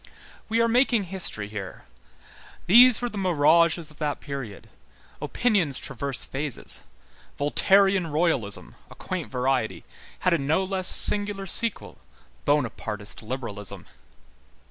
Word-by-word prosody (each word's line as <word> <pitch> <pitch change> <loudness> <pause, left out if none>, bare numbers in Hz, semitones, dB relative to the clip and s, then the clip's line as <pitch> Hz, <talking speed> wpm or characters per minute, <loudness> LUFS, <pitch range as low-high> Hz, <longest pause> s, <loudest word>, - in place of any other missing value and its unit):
We 225 +1 +1
are 230 - +3
making 240 -2 +2
history 175 - -4
here. 105 -3 -8 0.8
These 245 +5 +7
were 245 - -1
the 210 - -6
mirages 170 -2 +2
of 150 - -20
that 150 -2 -2
period. 135 -8 -8 0.5
Opinions 195 - 0
traverse 135 0 -3
phases. 140 -1 -2 0.6
Voltairian 190 +5 +3
royalism, 150 - -1 0.2
a - - -13
quaint 185 -4 -5
variety, 125 -2 -1 0.4
had 180 - +2
a 170 - +1
no 155 +7 0
less 190 -1 -2
singular 205 -1 +3
sequel, 225 +3 +2 0.5
Bonapartist 110 -7 -2
liberalism. 110 -5 -6
160 Hz, 115 wpm, -25 LUFS, 135-195 Hz, 0.8 s, These